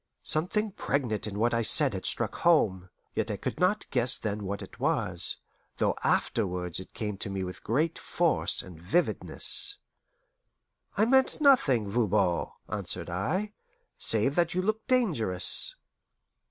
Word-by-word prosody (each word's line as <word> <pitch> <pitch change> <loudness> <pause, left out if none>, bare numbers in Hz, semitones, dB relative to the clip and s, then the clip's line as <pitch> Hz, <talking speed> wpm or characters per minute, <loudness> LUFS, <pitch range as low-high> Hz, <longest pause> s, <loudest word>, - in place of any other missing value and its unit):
Something 205 +7 +1
pregnant 130 - -2
in 100 -1 -6
what 120 +3 +1
I 115 - +1
said 140 +3 +4
had 95 - -3
struck 120 -4 +2
home, 95 - +2 0.2
yet - - -2
I - - -3
could - - -5
not 185 +4 +1
guess 125 0 +1
then 105 -1 -4
what 100 +1 -4
it - - -14
was, - - 0 0.4
though - - +1
afterwards 90 -5 -1
it 95 - -12
came 105 -3 -4
to - - -3
me 95 -1 -3
with 90 0 -8
great 150 +8 -1
force 170 -2 0
and 85 -3 -13
vividness. 180 - +2 1.2
"I 215 - +4
meant 265 +5 +2
nothing, 150 - +4
Voban," 100 -5 +1 0.2
answered - - -2
I, 185 - -2 0.5
"save 135 - +4
that 170 0 +1
you 185 - 0
look 215 +2 -2
dangerous." 155 - +2
120 Hz, 145 wpm, -28 LUFS, -, 1.2 s, said